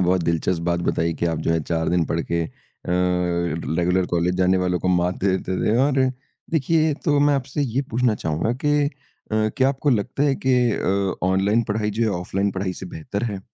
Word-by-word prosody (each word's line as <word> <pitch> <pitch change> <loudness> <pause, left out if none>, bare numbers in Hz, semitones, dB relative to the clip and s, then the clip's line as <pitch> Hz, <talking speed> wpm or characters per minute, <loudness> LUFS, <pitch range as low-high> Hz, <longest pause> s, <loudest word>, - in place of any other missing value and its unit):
बहुत 90 0 +2
दिलचस्प 85 +1 0
बात 85 0 0
बताई 85 0 +1
कि 85 - -1
आप 80 -2 -1
जो 80 - -1
है 80 - +1
चार 80 +1 -1
दिन 85 -1 +2
पढ़ 85 - -1
के 85 0 +1
अ, - - -6 0.4
रेगुलर 90 0 0
कॉलेज 90 +1 0
जाने 95 0 +3
वालों 90 -1 0
को 95 - -2
मात 90 0 +2
दे 95 -2 +3
देते 95 0 -3
थे 110 - +2
और 140 -2 +1 0.5
देखिए 160 +1 +2
तो 145 -3 +3
मैं 145 0 +4
आपसे 140 +2 -2
ये 135 0 -1
पूछना 120 -1 +2
चाहूँगा 80 +4 -1
कि 145 0 +3
अ, - - +1 0.7
क्या 130 0 +4
आपको 140 +1 0
लगता 120 +3 0
है 145 -2 +3
कि 130 - +4 0.2
अ, 100 -2 -1
ऑनलाइन 100 +5 +2
पढ़ाई 105 0 0
जो 110 +3 -2
है 110 - +2
ऑफ़लाइन 95 +3 -1
पढ़ाई 95 0 -2
से - - -4
बेहतर 90 +5 -5
है? 105 -5 -3
95 Hz, 210 wpm, -22 LUFS, 85-120 Hz, 0.7 s, मैं